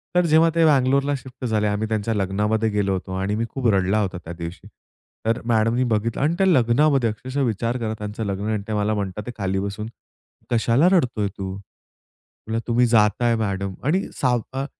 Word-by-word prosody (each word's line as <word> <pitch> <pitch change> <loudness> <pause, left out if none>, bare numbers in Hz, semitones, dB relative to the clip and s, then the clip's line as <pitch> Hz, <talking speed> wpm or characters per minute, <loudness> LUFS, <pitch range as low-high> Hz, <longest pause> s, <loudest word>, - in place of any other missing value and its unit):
तर 180 0 +4
जेव्हा 160 +1 +5
ते 165 -1 +4
बँगलोरला 140 -1 +3
शिफ्ट 130 -1 -9
झाले, 110 -2 +1
आम्ही 105 +1 -1
त्यांच्या 110 0 -1
लग्नामध्ये 105 +3 0
गेलो 100 -2 0
होतो 95 0 -4
आणि 100 +2 -1
मी 115 +2 -1
खूप 130 0 -2
रडला 95 +2 +2
होता 95 -3 -2
त्या 85 - -7
दिवशी. 85 +1 -8 0.6
तर 115 +2 0
मॅडमनी 115 +1 +2
बघितलं 115 0 -1
आणि 155 +4 +2
त्या 195 0 +3
लग्नामध्ये 135 -3 +3
अक्षरशः 130 +6 -4
विचार 115 +2 -1
करा, 110 -3 -3
त्यांचं 105 +1 -5
लग्न 100 +1 -3
आणि 105 -2 -2
ते 110 - -3
मला 105 0 +1
म्हणतात, 100 0 -3
ते - - -3
खाली 95 -2 -1
बसून, 100 +2 -4 0.6
कशाला 120 +6 +3
रडतोय 120 - +2
तू? 95 0 -5
तुला, 110 +3 -10
तुम्ही 120 +1 +3
जाताय 115 +1 +3
मॅडम 100 -3 -2
आणि 180 +7 +1 0.2
सा 125 -2 +3 0.2
अ, 135 +1 -2
110 Hz, 185 wpm, -22 LUFS, 105-125 Hz, 0.6 s, जेव्हा